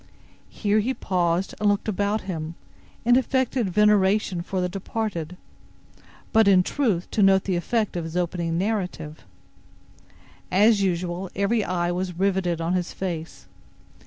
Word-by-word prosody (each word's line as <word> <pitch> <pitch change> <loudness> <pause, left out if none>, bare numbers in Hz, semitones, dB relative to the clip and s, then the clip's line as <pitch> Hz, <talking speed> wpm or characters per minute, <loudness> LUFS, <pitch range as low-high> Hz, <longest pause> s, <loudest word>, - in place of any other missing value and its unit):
Here 210 0 +1
he 250 +5 -1
paused, 180 0 0
and 210 - +3
looked 205 +1 0
about 205 +1 0
him, 165 -3 -5 0.5
in 240 +1 +5
affected 260 -4 0
veneration 200 -1 +3
for 185 +2 -3
the 180 - 0
departed, 180 -3 -4 1.0
but, 220 -2 +5
in 185 -2 +6
truth, 210 -8 0
to 215 - 0
note 195 -1 +5
the 190 - -1
effect 215 +4 -1
of 175 - -2
his 165 +2 -5
opening 170 -1 -1
narrative. 180 -6 -3 1.3
As 205 +2 +4
usual, 180 0 -1
every 205 +3 +1
eye 175 -2 -1
was 180 -1 -3
riveted 185 -3 0
on 165 +2 -1
his 180 -1 -2
face. 170 -4 -5
190 Hz, 140 wpm, -24 LUFS, 175-210 Hz, 1.3 s, in